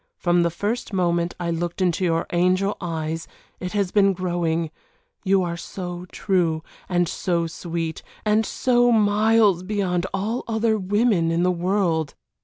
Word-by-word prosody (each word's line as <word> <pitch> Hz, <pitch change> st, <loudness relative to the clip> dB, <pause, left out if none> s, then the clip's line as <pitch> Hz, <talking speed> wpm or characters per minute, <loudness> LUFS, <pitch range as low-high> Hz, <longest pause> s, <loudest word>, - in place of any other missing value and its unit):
From 175 Hz, 0 st, +2 dB
the 170 Hz, -, +2 dB
first 210 Hz, +6 st, -3 dB
moment 175 Hz, -2 st, +1 dB
I 170 Hz, -1 st, -1 dB
looked 170 Hz, +2 st, -3 dB
into 185 Hz, 0 st, +1 dB
your 165 Hz, -2 st, +1 dB
angel 185 Hz, +3 st, +2 dB
eyes 165 Hz, -2 st, -3 dB, 0.3 s
it 180 Hz, +1 st, -5 dB
has 200 Hz, -3 st, 0 dB
been 195 Hz, -2 st, +4 dB
growing, 170 Hz, -3 st, -1 dB, 0.5 s
you 195 Hz, -1 st, +3 dB
are 170 Hz, -1 st, -2 dB
so 180 Hz, 0 st, -6 dB
true 170 Hz, -5 st, 0 dB, 0.3 s
and 175 Hz, -1 st, +2 dB
so 170 Hz, 0 st, -1 dB
sweet, 165 Hz, -1 st, -4 dB, 0.2 s
and 215 Hz, +1 st, +3 dB
so 245 Hz, +1 st, +2 dB
miles 215 Hz, -3 st, +4 dB
beyond 185 Hz, -2 st, -1 dB
all 210 Hz, +5 st, -2 dB
other 220 Hz, -1 st, +1 dB
women 200 Hz, -3 st, +2 dB
in 165 Hz, +1 st, +1 dB
the 180 Hz, -, +3 dB
world. 175 Hz, -3 st, 0 dB
180 Hz, 150 wpm, -23 LUFS, 170-205 Hz, 0.5 s, been